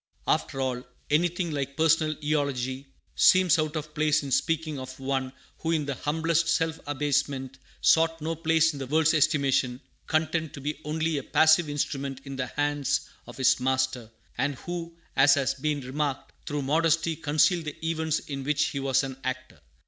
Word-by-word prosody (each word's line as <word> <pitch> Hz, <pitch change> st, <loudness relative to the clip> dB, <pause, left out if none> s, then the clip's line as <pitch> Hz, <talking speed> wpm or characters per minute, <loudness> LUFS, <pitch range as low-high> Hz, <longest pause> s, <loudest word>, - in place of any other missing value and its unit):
'" -, -, -33 dB
After 135 Hz, -, -6 dB
all, 125 Hz, -2 st, -2 dB, 0.3 s
anything 175 Hz, +2 st, +1 dB
like 140 Hz, -1 st, -4 dB
personal 160 Hz, -1 st, +3 dB
eulogy 140 Hz, -3 st, -1 dB, 0.3 s
seems 185 Hz, -4 st, +5 dB
out 155 Hz, 0 st, -1 dB
of 155 Hz, 0 st, -5 dB
place 150 Hz, 0 st, +2 dB
in 140 Hz, -, -6 dB
speaking 155 Hz, +2 st, 0 dB
of 130 Hz, 0 st, -8 dB
one 135 Hz, -1 st, -2 dB, 0.3 s
who 160 Hz, -, -3 dB
in 160 Hz, -3 st, +1 dB
the 140 Hz, -, -2 dB
humblest 160 Hz, +4 st, 0 dB
self 165 Hz, -1 st, 0 dB
abasement 135 Hz, -2 st, -1 dB, 0.2 s
sought 165 Hz, 0 st, +4 dB
no 160 Hz, +2 st, -2 dB
place 160 Hz, 0 st, +2 dB
in 140 Hz, -, -7 dB
the 135 Hz, -, -5 dB
world's 160 Hz, +3 st, +3 dB
estimation, 135 Hz, -5 st, +2 dB, 0.3 s
content 160 Hz, -1 st, 0 dB
to -, -, -8 dB
be 150 Hz, +2 st, -4 dB
only 160 Hz, 0 st, -1 dB
a -, -, -8 dB
passive 160 Hz, +2 st, +4 dB
instrument 140 Hz, -2 st, -3 dB
in 135 Hz, 0 st, -6 dB
the 130 Hz, -1 st, -2 dB
hands 145 Hz, 0 st, 0 dB, 0.3 s
of -, -, -11 dB
his 130 Hz, -1 st, +3 dB
Master; 130 Hz, -2 st, 0 dB, 0.3 s
and 140 Hz, +1 st, 0 dB
who, 170 Hz, +3 st, -6 dB, 0.2 s
as 135 Hz, +2 st, +6 dB
has 140 Hz, -2 st, +1 dB
been 145 Hz, +1 st, -2 dB
remarked, 135 Hz, +2 st, -3 dB, 0.2 s
through 145 Hz, -1 st, -2 dB
modesty 165 Hz, +3 st, +2 dB
concealed 155 Hz, +2 st, +2 dB
the 150 Hz, +2 st, -7 dB
events 160 Hz, -1 st, 0 dB
in 140 Hz, -2 st, -6 dB
which 150 Hz, +1 st, +1 dB
he 140 Hz, -, -4 dB
was 135 Hz, 0 st, +1 dB
an 135 Hz, -1 st, -5 dB
actor. 130 Hz, 0 st, -5 dB
150 Hz, 175 wpm, -27 LUFS, 135-160 Hz, 0.3 s, as